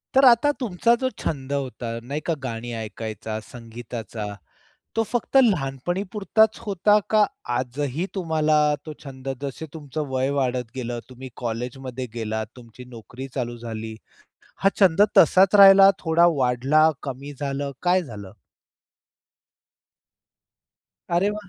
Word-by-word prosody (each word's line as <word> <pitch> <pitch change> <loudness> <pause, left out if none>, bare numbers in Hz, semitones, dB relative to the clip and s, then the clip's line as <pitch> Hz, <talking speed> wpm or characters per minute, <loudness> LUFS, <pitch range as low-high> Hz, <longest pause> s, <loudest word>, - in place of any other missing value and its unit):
तर 270 +1 +6
आता 250 +4 +6
तुमचा 235 0 +2
जो 260 - +1
छंद 140 -2 -3
होता 130 -4 -4
नाही 140 +5 -4
का? 170 - +1
गाणी 120 -1 -5
ऐकायचा, 110 0 -6
संगीताचा 115 -1 -8 0.7
तो 225 - +3
फक्त 240 +3 -1
लहानपणी 175 - 0
पुरताचं 220 +2 +2
होता 205 +2 +3
का? 215 -1 +5 0.3
आजही 140 +6 -2
तुम्हाला 160 -4 +1 0.3
तो 155 - -5
छंद 135 -1 -9
जसे 140 +3 -5
तुमचं 150 0 -5
वय 130 +1 0
वाढत 125 -3 -1
गेलं, 120 -2 -4
तुम्ही 130 +1 -10 0.2
कॉलेजमध्ये 125 +2 -4
गेलात, 110 -1 -3
तुमची 120 +1 -13
नोकरी 120 +4 -9
चालू 120 -2 -3
झाली, 110 -1 -6 0.7
हा 195 - +6
छंद 190 -1 +5 0.2
तसाचं 195 +2 +6
राहिला, 195 0 +9
थोडा 165 0 +3
वाढला 135 +5 +3
कमी 140 +1 -6
झालं, 140 0 -3
काय 180 +1 +3
झालं? 105 -8 -9 2.8
अरे 180 +4 +2
वाह! 210 -2 -7
135 Hz, 125 wpm, -23 LUFS, 120-180 Hz, 2.8 s, राहिला